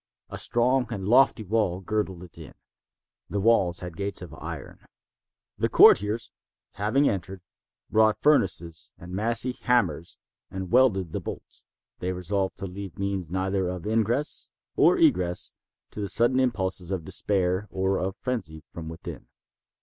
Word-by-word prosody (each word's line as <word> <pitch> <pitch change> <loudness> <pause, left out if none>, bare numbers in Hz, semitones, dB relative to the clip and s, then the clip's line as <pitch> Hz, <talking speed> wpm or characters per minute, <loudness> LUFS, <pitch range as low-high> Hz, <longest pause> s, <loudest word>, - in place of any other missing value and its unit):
A - - -4
strong 125 +2 +2
and 100 -5 -4
lofty 120 -1 +4
wall 100 -3 0
girdled 95 -3 -3
it 90 - -14
in. - - -12 0.7
This 100 - -2
wall 100 -4 +3
had 90 -2 -7
gates 100 0 -3
of 90 - -10
iron. - - -8 0.8
The - - +1
courtiers, 105 +3 +5 0.4
having 110 +8 +1
entered, 95 -1 -3 0.5
brought 110 0 +3
furnaces 85 - +1
and 90 +1 -11
massy 115 +5 +2
hammers 110 - 0 0.3
and 95 -1 -6
welded 100 -10 +3
the - - -3
bolts. - - -8 0.3
They 90 +1 -2
resolved 95 +1 -2
to 95 - -5
leave 95 -1 -8
means 100 -4 -3
neither 95 0 -1
of 90 -2 -6
ingress 115 +6 0 0.3
or - - +5
egress 90 0 +2 0.4
to 105 - -6
the 100 - -3
sudden 120 +3 +2
impulses 95 -8 0
of 95 -5 -3
despair 95 +1 0
or 95 0 0
of 95 +1 -3
frenzy 95 -12 -4
from 80 -1 -7
within. 80 - -9
95 Hz, 145 wpm, -26 LUFS, 90-110 Hz, 0.8 s, courtiers